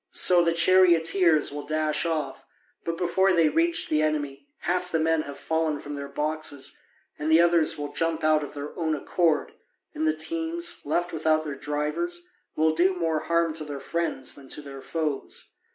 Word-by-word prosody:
So 175 Hz, -1 st, +6 dB
the 170 Hz, -, +2 dB
charioteers 170 Hz, -2 st, +4 dB
will 145 Hz, +1 st, -5 dB
dash 155 Hz, +2 st, 0 dB
off, 160 Hz, -2 st, -3 dB, 0.4 s
but 165 Hz, 0 st, -3 dB
before 190 Hz, +2 st, +2 dB
they 165 Hz, -3 st, +4 dB
reach 335 Hz, +1 st, +1 dB
the 155 Hz, 0 st, +1 dB
enemy 150 Hz, -, -2 dB
half 180 Hz, 0 st, -1 dB
the 165 Hz, -, +1 dB
men 160 Hz, 0 st, +2 dB
have 145 Hz, -2 st, -8 dB
fallen 160 Hz, -2 st, -1 dB
from 145 Hz, -, -8 dB
their 140 Hz, -1 st, -5 dB
boxes, 150 Hz, 0 st, -2 dB, 0.4 s
and 150 Hz, +2 st, -1 dB
the 160 Hz, -, +6 dB
others 170 Hz, -2 st, +3 dB
will 145 Hz, 0 st, -5 dB
jump 165 Hz, +1 st, -1 dB
out 155 Hz, -1 st, +3 dB
of 145 Hz, -, -8 dB
their 145 Hz, +1 st, -7 dB
own 160 Hz, -3 st, -1 dB
accord, 160 Hz, +1 st, 0 dB, 0.4 s
and 315 Hz, 0 st, -1 dB
the 315 Hz, -, +2 dB
teams, 335 Hz, +1 st, -1 dB
left 175 Hz, +4 st, -1 dB
without 155 Hz, 0 st, +1 dB
their 150 Hz, -2 st, -5 dB
drivers, 150 Hz, -, -3 dB, 0.3 s
will 155 Hz, 0 st, +2 dB
do 180 Hz, +4 st, +2 dB
more 165 Hz, -3 st, 0 dB
harm 170 Hz, +1 st, 0 dB
to 155 Hz, 0 st, -4 dB
their 145 Hz, -2 st, -6 dB
friends 165 Hz, -5 st, -2 dB
than 135 Hz, -2 st, -12 dB
to -, -, -2 dB
their 135 Hz, -1 st, -9 dB
foes. 155 Hz, -3 st, -4 dB
160 Hz, 185 wpm, -26 LUFS, 150-175 Hz, 0.4 s, So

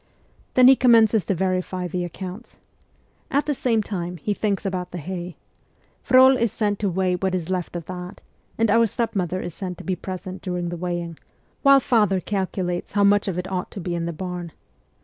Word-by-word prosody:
Then 255 Hz, 0 st, +7 dB
he 265 Hz, -, +9 dB
commences 225 Hz, -5 st, +4 dB
to 195 Hz, -, 0 dB
verify 185 Hz, 0 st, -1 dB
the 180 Hz, +1 st, -3 dB
accounts. 185 Hz, +5 st, -8 dB, 0.7 s
At 285 Hz, +2 st, +1 dB
the 295 Hz, -, 0 dB
same 230 Hz, -5 st, +1 dB
time, 180 Hz, -3 st, -4 dB
he 205 Hz, +7 st, -2 dB
thinks 205 Hz, -1 st, -1 dB
about 180 Hz, -2 st, -2 dB
the 180 Hz, -, -7 dB
hay. 175 Hz, +1 st, -6 dB, 0.7 s
Frol 260 Hz, +1 st, +6 dB
is 235 Hz, -4 st, +1 dB
sent 205 Hz, -2 st, -1 dB
to 205 Hz, -, 0 dB
weigh 185 Hz, 0 st, 0 dB
what 185 Hz, +1 st, -1 dB
is 180 Hz, 0 st, -3 dB
left 180 Hz, -2 st, -3 dB
of 170 Hz, -2 st, -5 dB
that, 180 Hz, +1 st, -7 dB, 0.4 s
and 225 Hz, -1 st, +2 dB
our 230 Hz, +1 st, +5 dB
stepmother 190 Hz, -5 st, -2 dB
is 175 Hz, -, -5 dB
sent 180 Hz, 0 st, -6 dB
to -, -, -10 dB
be 185 Hz, -, -1 dB
present 185 Hz, +1 st, -7 dB
during 180 Hz, -2 st, -3 dB
the 175 Hz, -, -4 dB
weighing, 175 Hz, -1 st, -4 dB, 0.4 s
while 275 Hz, -1 st, +7 dB
father 210 Hz, -7 st, +2 dB
calcu 190 Hz, -1 st, -2 dB
lates 175 Hz, 0 st, -4 dB
how 205 Hz, 0 st, +3 dB
much 205 Hz, 0 st, +4 dB
of 185 Hz, -3 st, -2 dB
it 180 Hz, +1 st, -4 dB
ought 180 Hz, -1 st, -2 dB
to -, -, -8 dB
be 175 Hz, -1 st, -3 dB
in 170 Hz, -1 st, -2 dB
the -, -, -2 dB
barn. 175 Hz, -1 st, -6 dB
185 Hz, 205 wpm, -23 LUFS, 180-210 Hz, 0.7 s, he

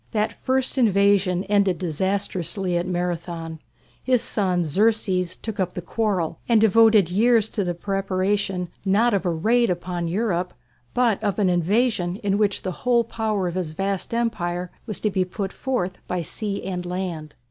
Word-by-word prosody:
That 215 Hz, -1 st, 0 dB
first 260 Hz, 0 st, +1 dB
invasion 200 Hz, -4 st, +3 dB
ended 200 Hz, -3 st, +2 dB
disastrously 185 Hz, +1 st, -1 dB
at 175 Hz, +1 st, 0 dB
Marathon. 170 Hz, -2 st, -3 dB, 0.4 s
His 255 Hz, -2 st, +2 dB
son, 185 Hz, -4 st, +1 dB
Xerxes, 185 Hz, 0 st, +1 dB
took 220 Hz, -3 st, -6 dB
up 185 Hz, -1 st, 0 dB
the 180 Hz, -, -3 dB
quarrel 185 Hz, -5 st, -1 dB
and 230 Hz, -2 st, +5 dB
devoted 220 Hz, -3 st, +5 dB
years 225 Hz, +2 st, +4 dB
to 205 Hz, -, -2 dB
the 175 Hz, -1 st, -2 dB
preparation 195 Hz, -1 st, -1 dB
not 210 Hz, +5 st, +3 dB
of 195 Hz, -2 st, 0 dB
a -, -, +2 dB
raid 225 Hz, +9 st, +2 dB
upon 175 Hz, -1 st, -2 dB
Europe, 180 Hz, -1 st, -1 dB, 0.4 s
but 235 Hz, -4 st, +2 dB
of 205 Hz, -2 st, 0 dB
an 195 Hz, -4 st, +2 dB
invasion 180 Hz, +1 st, +1 dB
in 200 Hz, 0 st, +1 dB
which 205 Hz, -2 st, +1 dB
the 185 Hz, -, -2 dB
whole 240 Hz, -1 st, +3 dB
power 215 Hz, -4 st, -2 dB
of 175 Hz, -, -3 dB
his 175 Hz, -4 st, -3 dB
vast 195 Hz, +1 st, -2 dB
empire 180 Hz, -7 st, -2 dB, 0.2 s
was 215 Hz, -, -2 dB
to 210 Hz, -, +1 dB
be 190 Hz, -1 st, +1 dB
put 190 Hz, +1 st, -5 dB
forth 190 Hz, -9 st, -2 dB
by 180 Hz, -1 st, -1 dB
sea 200 Hz, +4 st, -4 dB
and 180 Hz, -1 st, -3 dB
land. 175 Hz, -4 st, -5 dB
195 Hz, 165 wpm, -23 LUFS, 180-215 Hz, 0.4 s, and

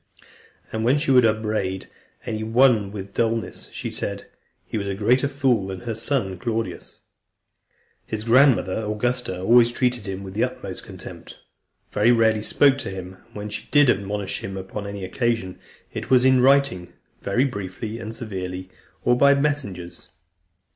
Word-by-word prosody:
And 110 Hz, 0 st, -2 dB
when 125 Hz, +5 st, +4 dB
she 145 Hz, -1 st, 0 dB
would 125 Hz, -3 st, +6 dB
upbraid 110 Hz, -3 st, -1 dB, 0.4 s
any 110 Hz, 0 st, -3 dB
one 110 Hz, -2 st, +3 dB
with 100 Hz, -1 st, -7 dB
dulness, 115 Hz, -3 st, -2 dB
she -, -, -5 dB
said, -, -, -4 dB, 0.4 s
"He -, -, -7 dB
was 100 Hz, -2 st, -2 dB
a 100 Hz, -, -2 dB
greater 125 Hz, +7 st, +2 dB
fool 135 Hz, -8 st, +1 dB
than 95 Hz, -1 st, -6 dB
her 120 Hz, -2 st, -3 dB
son, 110 Hz, -5 st, -2 dB
Claudius." 115 Hz, +2 st, -4 dB, 1.1 s
His 110 Hz, -1 st, -4 dB
grandmother, 115 Hz, -4 st, +4 dB
Augusta, 105 Hz, -2 st, -2 dB
always 115 Hz, +5 st, +5 dB
treated 120 Hz, -3 st, -1 dB
him 95 Hz, 0 st, -5 dB
with 95 Hz, -1 st, -8 dB
the 110 Hz, -, +1 dB
utmost -, -, -4 dB
contempt, -, -, -10 dB, 0.6 s
very 120 Hz, -, +4 dB
rarely 110 Hz, -2 st, +3 dB
spoke 135 Hz, +5 st, +4 dB
to -, -, -4 dB
him, 95 Hz, 0 st, -7 dB
and -, -, -26 dB
when 105 Hz, 0 st, -5 dB
she -, -, -6 dB
did 145 Hz, -4 st, +6 dB
admonish 100 Hz, 0 st, -3 dB
him 95 Hz, 0 st, -5 dB
upon 95 Hz, +2 st, -6 dB
any 100 Hz, -1 st, -5 dB
occasion, 115 Hz, -1 st, -1 dB, 0.3 s
it -, -, -5 dB
was 130 Hz, -1 st, +5 dB
in 130 Hz, -1 st, +5 dB
writing, 130 Hz, -10 st, +3 dB, 0.3 s
very 120 Hz, +7 st, +1 dB
briefly 105 Hz, -1 st, -5 dB
and 115 Hz, 0 st, -6 dB
severely, 95 Hz, -5 st, -6 dB, 0.3 s
or 120 Hz, -, +4 dB
by 140 Hz, +2 st, +5 dB
messengers. 140 Hz, -12 st, -2 dB
110 Hz, 160 wpm, -23 LUFS, 95-125 Hz, 1.1 s, would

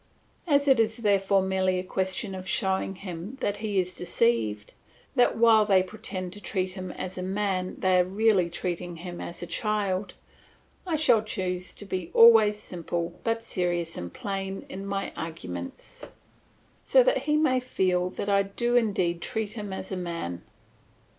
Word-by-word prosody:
As 285 Hz, -2 st, +3 dB
it 265 Hz, -4 st, +5 dB
is 220 Hz, 0 st, +2 dB
therefore 200 Hz, -3 st, +2 dB
merely 190 Hz, -1 st, +1 dB
a 180 Hz, -, -2 dB
question 190 Hz, +2 st, -2 dB
of 185 Hz, 0 st, -7 dB
showing 190 Hz, -1 st, 0 dB
him 185 Hz, +5 st, -7 dB
that 205 Hz, 0 st, -1 dB
he 210 Hz, -3 st, -1 dB
is 180 Hz, -1 st, -2 dB
deceived, 170 Hz, -, 0 dB, 0.4 s
that 245 Hz, -2 st, +3 dB
while 225 Hz, -2 st, +6 dB
they 195 Hz, -3 st, +4 dB
pretend 185 Hz, -2 st, -5 dB
to 205 Hz, -, -10 dB
treat 185 Hz, 0 st, -2 dB
him 185 Hz, -1 st, -6 dB
as 185 Hz, 0 st, -4 dB
a -, -, -3 dB
man 190 Hz, -1 st, -1 dB
they 185 Hz, -1 st, +3 dB
are -, -, +5 dB
really 195 Hz, -1 st, +2 dB
treating 175 Hz, 0 st, -4 dB
him 175 Hz, +1 st, -7 dB
as 170 Hz, -, -4 dB
a -, -, -3 dB
child, 205 Hz, -1 st, -1 dB, 0.7 s
I 335 Hz, -, +1 dB
shall 295 Hz, -8 st, +4 dB
choose 185 Hz, -4 st, -3 dB
to 205 Hz, -, -11 dB
be 185 Hz, -3 st, -4 dB
always 225 Hz, -2 st, +7 dB
simple 175 Hz, -2 st, -4 dB
but 230 Hz, 0 st, -1 dB
serious 175 Hz, -5 st, -1 dB
and 85 Hz, -1 st, -6 dB
plain 195 Hz, -, -4 dB
in 195 Hz, +1 st, -6 dB
my 195 Hz, 0 st, -3 dB
arguments, 90 Hz, -, -7 dB, 0.8 s
so -, -, +5 dB
that -, -, +2 dB
he 300 Hz, -, +4 dB
may 280 Hz, -5 st, +3 dB
feel 185 Hz, -7 st, 0 dB
that 200 Hz, -, -5 dB
I 200 Hz, -1 st, +4 dB
do 235 Hz, +5 st, -1 dB
indeed 185 Hz, -7 st, +1 dB
treat 220 Hz, +2 st, -2 dB
him 210 Hz, -3 st, -6 dB
as 190 Hz, 0 st, -6 dB
a 190 Hz, -, -2 dB
man. 170 Hz, -, -4 dB
190 Hz, 170 wpm, -27 LUFS, 180-215 Hz, 0.8 s, always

